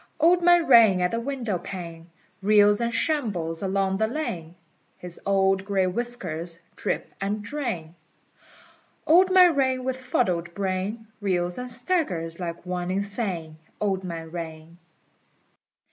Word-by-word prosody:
Old 345 +3 +5
Man 350 -1 +5
Rain 225 - +7
at 180 0 +1
the 230 - -1
windowpane 185 -9 -5 0.3
Reels 205 +1 +5
and 235 0 0
shambles 215 - -1
along 195 0 0
the 220 - +2
lane: 180 - -4 0.4
His 180 -1 -9
old 195 -1 +2
gray 195 -1 +1
whiskers 180 -6 -3 0.2
drip - - -3
and 205 +2 -2
drain: 220 - -4 1.1
Old 360 +4 +6
Man 365 -3 +6
Rain 260 -2 +1
with 260 0 -2
fuddled 175 -9 -1
brain 195 +3 -2 0.2
Reels 180 -2 -1
and 250 0 -5
staggers 235 - -1
like 170 -1 -5
one 180 0 -3
insane. 190 -5 -3 0.2
Old 195 -2 -1
Man 165 -3 -6
Rain. 165 0 -8
195 Hz, 130 wpm, -25 LUFS, 175-240 Hz, 1.1 s, Rain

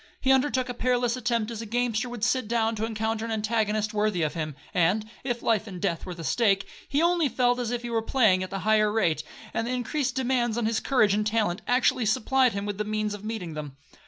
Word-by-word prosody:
He 265 - +2
undertook 265 -1 +2
a 245 - -3
perilous 245 0 +1
attempt 235 -3 -1
as 225 -1 -5
a - - -6
gamester 240 0 0
would 240 -3 -7
sit 240 +1 +1
down 225 0 +1
to 220 +1 -1
encounter 220 0 -2
an 230 - -4
antagonist 215 -1 0
worthy 210 -5 +1
of 155 - -1
him; 155 -4 -4 0.2
and, 185 +5 +2 0.2
if 245 -2 -3
life 225 -1 +1
and 185 -3 -7
death 170 +1 -2
were 180 - -5
the 165 - -8
stake, 195 - +2 0.2
he 290 +3 +2
only 340 -4 +3
felt 245 +1 +2
as 240 -2 -2
if 240 0 -3
he 240 - -4
were 225 -1 +1
playing 220 -6 +3
at 185 - -5
a 195 - -2
higher 215 -1 +4
rate, 175 -8 +1 0.3
and 225 - -1
the - - -2
increased 255 +1 -1
demands 245 -3 0
on 235 - 0
his 225 0 +1
courage 215 -7 +3
and 210 +1 +1
talent 215 -3 0
actually 245 -2 +2
supplied 255 +3 +2
him 200 0 -3
with 205 -1 -4
the - - +1
means 215 0 -2
of 205 0 -8
meeting 215 -7 -4
them. 150 -3 -7
220 Hz, 240 wpm, -26 LUFS, 210-245 Hz, 0.3 s, higher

